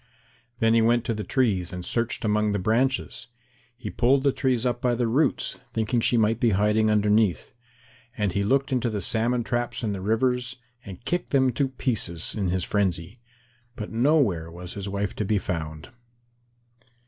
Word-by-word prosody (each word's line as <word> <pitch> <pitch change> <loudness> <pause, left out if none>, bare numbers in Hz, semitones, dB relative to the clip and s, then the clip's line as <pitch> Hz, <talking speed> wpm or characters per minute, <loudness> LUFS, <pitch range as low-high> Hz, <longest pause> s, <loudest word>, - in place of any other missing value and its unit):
Then 115 -2 +3
he 115 - +4
went 120 +1 +2
to 115 - 0
the 105 -1 -4
trees 100 -5 0
and 90 -1 -6
searched 115 -1 -1
among 105 0 +1
the - - +1
branches. 120 +5 0 0.5
He 120 -4 -6
pulled 130 +3 +2
the 140 - +4
trees 130 -3 0
up 120 -1 -1
by 125 -1 +1
the 120 0 0
roots, 135 +5 0
thinking 115 +2 0
she 120 +1 +2
might 110 +1 +2
be 120 - +3
hiding 105 +1 +2
underneath. 105 -2 +2 0.7
And 105 -3 0
he 100 +3 0
looked 135 +6 +1
into 125 -2 +1
the 105 -2 -3
salmon 120 +4 0
traps 120 +1 -2
in 110 - 0
the 95 - -5
rivers, 125 +4 0 0.3
and 100 +4 -11
kicked 175 +1 -1
them 130 -2 +3
to 135 +3 0
pieces 110 - -2
in 100 -4 -1
his 90 0 0
frenzy. 95 +1 -1 0.6
But 105 -3 -6
nowhere 115 - +2
was 90 +1 -8
his 100 0 -5
wife 100 0 -3
to - - 0
be 105 +1 +1
found. 80 -3 -5
110 Hz, 180 wpm, -25 LUFS, 100-125 Hz, 0.7 s, he